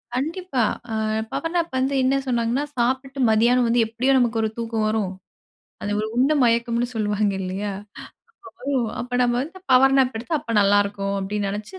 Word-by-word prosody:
கண்டிப்பா 320 Hz, +1 st, -3 dB, 0.3 s
அ -, -, -2 dB, 0.4 s
power 330 Hz, +1 st, -3 dB
nap 340 Hz, -3 st, 0 dB
வந்து 265 Hz, +2 st, 0 dB
என்ன 265 Hz, +1 st, +2 dB
சொன்னாங்கன்னா, 240 Hz, +2 st, 0 dB
சாப்ட்டு 265 Hz, +3 st, -1 dB
மதியானம் 240 Hz, +3 st, +4 dB
வந்து 235 Hz, +1 st, +2 dB
எப்படியும் 255 Hz, +4 st, +2 dB
நமக்கு 235 Hz, -2 st, +1 dB
ஒரு 220 Hz, -, 0 dB
தூக்கம் 225 Hz, -2 st, -2 dB
வரும். 215 Hz, -3 st, 0 dB, 0.7 s
அது 205 Hz, -, -3 dB
ஒரு 215 Hz, -, -2 dB
உண்ட 270 Hz, +5 st, +3 dB
மயக்கம்னு 235 Hz, 0 st, +1 dB
சொல்வாங்க 210 Hz, -1 st, 0 dB
இல்லையா? 195 Hz, +2 st, -3 dB, 1.3 s
அப்பறம் 250 Hz, +1 st, 0 dB
நம்ம 240 Hz, 0 st, +1 dB
வந்து 345 Hz, +7 st, -7 dB
பவர் 270 Hz, +1 st, +6 dB
நாப் 255 Hz, -3 st, +2 dB
எடுத்த 250 Hz, +9 st, -7 dB
அப்ப 255 Hz, -5 st, -6 dB
நல்லா 200 Hz, 0 st, +4 dB
இருக்கும் 200 Hz, 0 st, -3 dB
அப்படின்னு 200 Hz, +1 st, -2 dB
நெனைச்சு 210 Hz, -, -6 dB
235 Hz, 165 wpm, -23 LUFS, 215-265 Hz, 1.3 s, பவர்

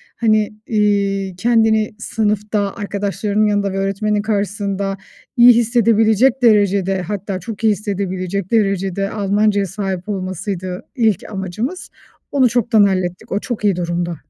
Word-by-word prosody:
hani, 215 Hz, -2 st, +1 dB
iii, 200 Hz, -3 st, 0 dB
kendini 220 Hz, +1 st, +2 dB
sınıfta 210 Hz, -2 st, -1 dB
arkadaşlarının 205 Hz, +1 st, -1 dB
yanında 205 Hz, -1 st, 0 dB
ve -, -, -3 dB
öğretmenin 200 Hz, +2 st, 0 dB
karşısında 200 Hz, -2 st, -2 dB, 0.4 s
iyi 245 Hz, +1 st, +8 dB
hissedebilecek 230 Hz, +1 st, +3 dB
derecede, 200 Hz, -4 st, +3 dB
hatta 195 Hz, +1 st, -4 dB
çok 210 Hz, +4 st, -8 dB
iyi 220 Hz, -, +5 dB
hissedebilecek 195 Hz, -2 st, -3 dB
derecede 195 Hz, -3 st, 0 dB
Almancaya 205 Hz, 0 st, +1 dB
sahip 190 Hz, 0 st, -4 dB
olmasıydı 185 Hz, -1 st, -4 dB
ilk 220 Hz, -, +1 dB
amacımız. 210 Hz, -, -4 dB, 0.4 s
Onu 260 Hz, -3 st, +3 dB
çoktan 230 Hz, -2 st, +3 dB
hallettik, 185 Hz, -2 st, -1 dB
o 200 Hz, -, 0 dB
çok 240 Hz, -1 st, -5 dB
iyi 200 Hz, -3 st, +3 dB
durumda. 175 Hz, 0 st, -2 dB
205 Hz, 120 wpm, -18 LUFS, 195-215 Hz, 0.4 s, iyi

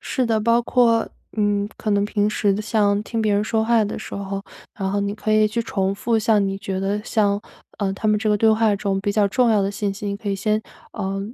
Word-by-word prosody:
是 255 Hz, -, -1 dB
的， 225 Hz, -1 st, +1 dB
包 230 Hz, +2 st, +3 dB
括， 230 Hz, -2 st, +2 dB, 0.3 s
嗯， 205 Hz, -1 st, +1 dB
可 215 Hz, -, -3 dB
能 200 Hz, 0 st, +2 dB
平 205 Hz, 0 st, 0 dB
时 205 Hz, -1 st, +1 dB
像 205 Hz, -2 st, +1 dB
听 225 Hz, +1 st, -3 dB
别 215 Hz, -1 st, +1 dB
人 205 Hz, +1 st, +1 dB
说 220 Hz, 0 st, 0 dB
话 230 Hz, -1 st, +3 dB
的 205 Hz, -, -4 dB
时 -, -, -8 dB
候， 195 Hz, 0 st, -4 dB, 0.3 s
然 195 Hz, -4 st, -3 dB
后 200 Hz, +1 st, 0 dB
你 200 Hz, 0 st, -2 dB
可 215 Hz, 0 st, -2 dB
以 215 Hz, 0 st, +5 dB
去 230 Hz, +2 st, -2 dB
重 195 Hz, -3 st, -1 dB
复 225 Hz, +2 st, 0 dB
像 210 Hz, -2 st, +3 dB
你 195 Hz, 0 st, -2 dB
觉 190 Hz, -1 st, -4 dB
得 200 Hz, +2 st, -1 dB
像 205 Hz, -4 st, +1 dB, 0.4 s
呃， 195 Hz, -2 st, 0 dB
他 215 Hz, +2 st, -2 dB
们 210 Hz, 0 st, +3 dB
这 215 Hz, -, -1 dB
个 210 Hz, -, +3 dB
对 220 Hz, +2 st, +4 dB
话 220 Hz, -1 st, +3 dB
中 195 Hz, -1 st, -1 dB
比 200 Hz, +1 st, -1 dB
较 205 Hz, -1 st, +2 dB
重 240 Hz, +3 st, +2 dB
要 210 Hz, -3 st, +3 dB
的 195 Hz, -, 0 dB
信 200 Hz, 0 st, -2 dB
息， 200 Hz, +1 st, -7 dB
你 200 Hz, -, -2 dB
可 205 Hz, 0 st, -6 dB
以 195 Hz, -, 0 dB
先， 215 Hz, +2 st, 0 dB, 0.3 s
呃， 195 Hz, +1 st, -3 dB
210 Hz, 270 characters per minute, -22 LUFS, 200-220 Hz, 0.4 s, 以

